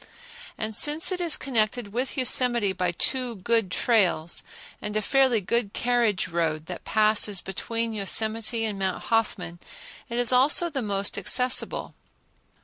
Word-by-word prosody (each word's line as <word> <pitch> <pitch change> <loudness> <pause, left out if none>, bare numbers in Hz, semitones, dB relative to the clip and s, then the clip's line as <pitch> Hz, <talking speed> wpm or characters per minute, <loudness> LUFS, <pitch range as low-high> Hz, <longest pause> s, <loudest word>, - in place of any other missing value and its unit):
And 220 0 -4
since 300 - +2
it 365 -1 -3
is 335 -3 +4
connected 220 -4 -2
with 255 +4 -3
Yosemite 240 -5 +3
by 180 -1 -1
two 250 +6 -1
good 225 +1 0
trails, 185 -6 +1 0.4
and 210 0 -3
a - - 0
fairly 260 -2 +2
good 220 +1 -1
carriage 235 -5 0
road 165 -3 -2
that 180 +1 -8
passes 215 -2 +3
between 230 +5 -4
Yosemite 220 +2 -1
and 205 -3 -4
Mount 190 -1 -2
Hoffman, 195 -6 -2 0.5
it 235 - -5
is 245 0 +3
also 295 +7 +4
the 275 -3 -3
most 200 -2 -2
accessible. 250 +6 +1
220 Hz, 145 wpm, -25 LUFS, 195-245 Hz, 0.5 s, is